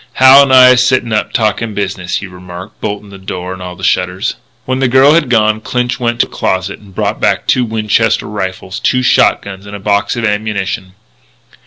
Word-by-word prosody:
"Hal 130 +1 +7
and 140 -1 +2
I 130 -1 +8
is 125 0 +4
sittin' 125 -3 0
up 105 - -1
talkin' 110 -1 -1
business," 95 -3 -3
he - - -3
remarked, 90 +1 -11
bolting 105 -1 -5
the 100 - -11
door 90 -1 -6
and 95 - -10
all 90 -1 -7
the - - -13
shutters. - - 0 0.3
When 130 0 -2
the 135 - +2
girl 130 +4 +5
had 155 -5 +2
gone, 110 -2 +2
Clinch 125 +1 -2
went 120 -1 -1
to - - +2
a - - -19
closet 95 +1 -2
and 100 -3 -18
brought - - -2
back - - +1
two 125 - +2
Winchester 110 -1 0
rifles, 95 -2 -5
two 125 0 +1
shot - - +3
guns, 100 0 -10
and 100 - -8
a - - -7
box 100 +1 0
of 120 -1 -2
ammunition. 105 -3 -3
105 Hz, 210 wpm, -13 LUFS, 95-125 Hz, 0.3 s, I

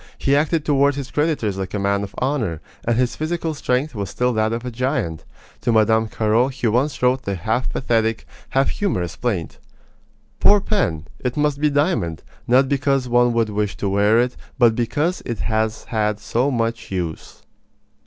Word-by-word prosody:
He 140 - +2
acted 155 +1 +1
toward 140 -1 +3
his 140 -2 -6
creditors 145 - 0
like 95 +1 -4
a - - -1
man 100 0 +1
of 100 -1 -7
honor, 125 - -1 0.3
and 120 -1 +1
his 125 -1 +1
physical 160 +1 -2
strength 140 0 -1
was 100 -4 -4
still 125 0 0
that 110 0 +1
of 115 +2 -3
a 125 - -3
giant. 120 - -2 0.4
To - - +1
Mme. 110 0 +3
Carraud 110 +3 +2
he 125 -1 -4
once 125 +4 +1
wrote 125 +1 +3
the 100 -4 -3
half 110 +8 -1
pathetic, 115 -3 0 0.2
half 135 +1 +2
humorous 90 - -2
plaint: 100 -10 -3 0.8
Poor 205 0 +6
pen! 180 - -1
It 125 +1 -3
must 145 -1 +1
be 150 - +4
diamond, 140 - 0 0.2
not 130 +3 +4
because 135 -1 +1
one 120 0 +3
would 115 -2 +1
wish 105 -1 -2
to 100 - -1
wear 105 +3 +3
it, 125 +1 +1 0.2
but 120 -4 +5
because 145 +10 -1
it 120 -3 -4
has 110 0 -1
had 105 -2 -1
so 120 +6 0
much 115 -3 -2
use! 85 -4 -5
120 Hz, 180 wpm, -21 LUFS, 105-140 Hz, 0.8 s, Poor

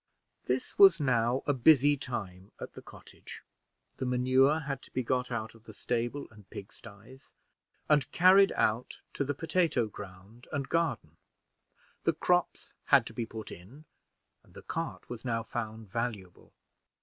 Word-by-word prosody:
This 130 +1 -3
was 190 -4 +8
now 125 -2 +1
a 145 - +2
busy 145 +2 +5
time 100 -9 -6
at - - -8
the - - -10
cottage. - - -13 0.5
The 130 - -3
manure 130 +4 +3
had 140 -2 -4
to - - -14
be 130 - -2
got 125 +1 -1
out 115 -2 -4
of 115 0 -20
the 110 - -12
stable 120 +5 -2
and 105 -2 -18
pigsties, 110 +5 -12 0.5
and 150 -4 +2
carried 190 +2 +6
out 110 +3 -1
to - - -1
the 145 +1 -3
potato 165 -4 +1
ground 100 +3 -12
and 140 -2 -3
garden; 135 - -1 0.9
the - - +2
crops 180 -1 0
had 135 -5 +5
to 115 - -9
be 115 -1 -4
put 110 -1 -8
in, 120 - -13 0.6
and - - -24
the - - -11
cart 165 0 -5
was 120 -1 -8
now 115 -3 -1
found 110 -1 -6
valuable. 110 -6 -5
125 Hz, 155 wpm, -30 LUFS, 110-145 Hz, 0.9 s, was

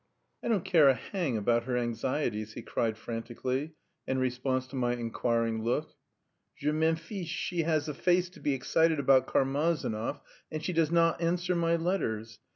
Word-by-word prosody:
"I - - -3
don't 215 -6 +1
care 155 -6 +6
a 135 - +4
hang 165 - -2
about 115 +2 +1
her 125 -1 0
anxieties," 120 -2 -1
he - - -7
cried 110 -2 -1
frantically, 125 +6 -3 0.3
in 130 - 0
response 130 0 0
to 140 - -8
my 120 -2 +1
inquiring 115 -1 -1
look. 135 +7 -1 0.6
"Je 150 +1 0
m'en 160 +1 +2
fiche! 170 +2 -6
She 170 +1 -1
has 155 -2 +1
the 150 - -3
face 175 +4 +2
to - - -15
be 145 - 0
excited 160 +5 +2
about 130 -2 +4
Karmazinov, 140 -3 0 0.3
and 155 0 -4
she 180 - -1
does 165 -2 +2
not 170 0 +3
answer 175 +2 +1
my 170 0 +2
letters. 115 - -2
140 Hz, 170 wpm, -30 LUFS, 120-165 Hz, 0.6 s, care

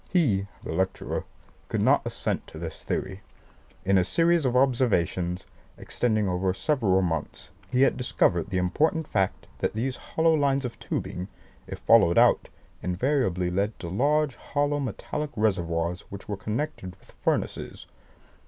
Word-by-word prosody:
He 110 - +2 0.2
(the - - -4
lecturer) 95 +3 -1 0.4
could - - -1
not - - +5
assent - - -3
to - - -11
this 80 -1 -7
theory. 95 +1 -3 0.6
In 95 0 +4
a - - +3
series 165 - +2
of 125 -1 +1
observations, 100 -9 +2 0.3
extending 110 -4 0
over 90 +1 0
several 105 -11 +2
months, 80 -3 -3 0.2
he 130 +1 +4
had 135 - +3
discovered 100 -7 +1
the 95 - -1
important 150 - +1
fact 95 -2 0
that - - 0
these 125 +3 -2 0.2
lines 145 -4 +3
of 120 - -6
tubing, 90 +1 -4 0.4
if - - -6
followed 100 -7 +5
out, - - +4 0.3
invariably 90 - 0
led 100 +4 -1
to 85 -3 -6
large 145 - +1
hollow 145 0 0
metallic 145 +4 -3
reservoirs 85 -5 0
which 100 0 -9
were 105 - -2
connected 105 - -4
with - - -21
furnaces. - - -2
105 Hz, 145 wpm, -27 LUFS, 90-135 Hz, 0.6 s, not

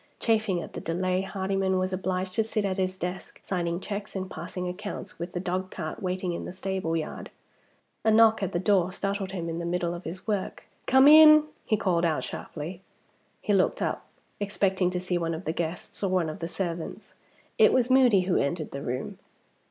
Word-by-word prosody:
Chafing 220 -5 +1
at - - -10
the - - -5
delay, 185 +2 0
Hardyman 195 -1 -1
was 185 0 -1
obliged 185 0 -2
to 225 - +2
sit 215 -1 -1
at 190 0 -1
his 185 0 -1
desk, 180 +1 -5
signing 170 -2 -2
checks 200 +1 -5
and 185 -1 -4
passing 180 +2 -5
accounts, 200 +1 -6
with 175 +2 -5
the 175 - -2
dogcart 185 -2 -4
waiting 185 -1 -2
in - - -5
the - - -6
stable 190 -3 -2
yard. 155 - -5 0.7
A 220 - +3
knock 220 0 +5
at 195 -1 -1
the - - -1
door 185 -1 +2
startled 195 0 -3
him 175 -3 -4
in 165 0 -3
the - - -4
middle 175 0 -1
of 175 +1 -7
his 180 +3 -7
work. 205 -4 -2 0.2
"Come 265 +1 +6
in," 305 0 +9 0.2
he 215 - +2
called 180 -5 +1
out 160 -3 +1
sharply. 170 +4 -6 0.6
He 205 - 0
looked 190 -2 +2
up, - - -2 0.3
expecting 195 -2 +1
to 180 0 -2
see 180 -1 -1
one 165 -1 -1
of 160 - -8
the 160 - -1
guests 170 +1 -4
or 195 - +1
one 180 -3 +1
of - - -9
the 165 - -3
servants. 175 -2 -5 0.5
It - - +7
was 255 0 +2
Moody 250 -7 +6
who 180 0 +1
entered 155 +3 -1
the 140 - -5
room. 125 -1 -4
185 Hz, 200 wpm, -27 LUFS, 175-195 Hz, 0.7 s, in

